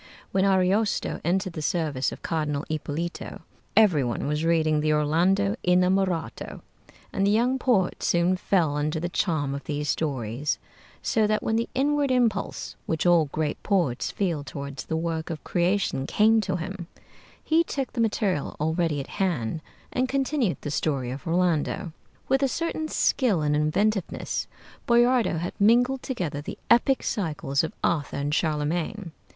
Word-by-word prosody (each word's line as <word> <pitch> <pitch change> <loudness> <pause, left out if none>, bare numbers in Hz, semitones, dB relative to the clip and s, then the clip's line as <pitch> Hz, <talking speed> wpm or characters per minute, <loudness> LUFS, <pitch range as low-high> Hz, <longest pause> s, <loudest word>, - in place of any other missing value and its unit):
When 190 0 +2
Ariosto 195 +2 +1
entered 185 +2 0
the 155 - -5
service 150 -5 0
of - - -10
Cardinal 150 -3 -1
Ippolito, 155 +2 -4 0.4
every 185 -11 +5
one 120 -2 -2
was 150 +2 -1
reading 160 -2 +2
the 155 0 +1
'Orlando 175 +7 +2
Innamorato,' 180 -1 +1 0.5
and 195 0 +1
the - - +4
young 245 +5 +2
poet 210 -9 +1
soon 175 +2 +2
fell 175 -5 +1
under 150 +2 -1
the 175 +2 -2
charm 155 -7 0
of 140 - -6
these 150 -2 -2
stories; 135 -2 -1 0.5
so 220 -3 +2
that 215 0 0
when 220 - 0
the 230 +1 0
inward 285 +1 +2
impulse 235 -6 0
which 160 0 -1
all 170 -3 +5
great 150 +1 -3
poets 170 - 0
feel 170 -7 -1
toward 140 0 -7
the 160 - -3
work 160 -1 -2
of 160 -2 -5
creation 175 -6 0
came 220 +1 +4
to 190 -3 -2
him, 175 0 -5 0.6
he 325 +1 +3
took 275 -5 -4
the 240 - 0
material 205 -8 0
already 160 0 0
at 135 - -4 0.2
hand 160 -6 -1 0.3
and 255 0 0
continued 270 - 0
the 145 - -4
story 135 -4 -1
of 140 +7 -7
'Orlando.' 175 +1 0 0.3
With 270 +1 +2
a 275 - +3
certain 315 +2 -2
skill 225 - +1
and 150 0 +2
inventiveness, 185 +6 0 0.4
Boiardo 240 -5 +4
had 175 +2 -3
mingled 245 +5 +4
together 170 - -3
the - - -7
epic 255 +3 +4
cycles 150 - -1
of 160 - -3
Arthur 155 -5 0
and 145 +1 -1
Charlemagne. 160 +5 -1
175 Hz, 155 wpm, -26 LUFS, 150-210 Hz, 0.6 s, every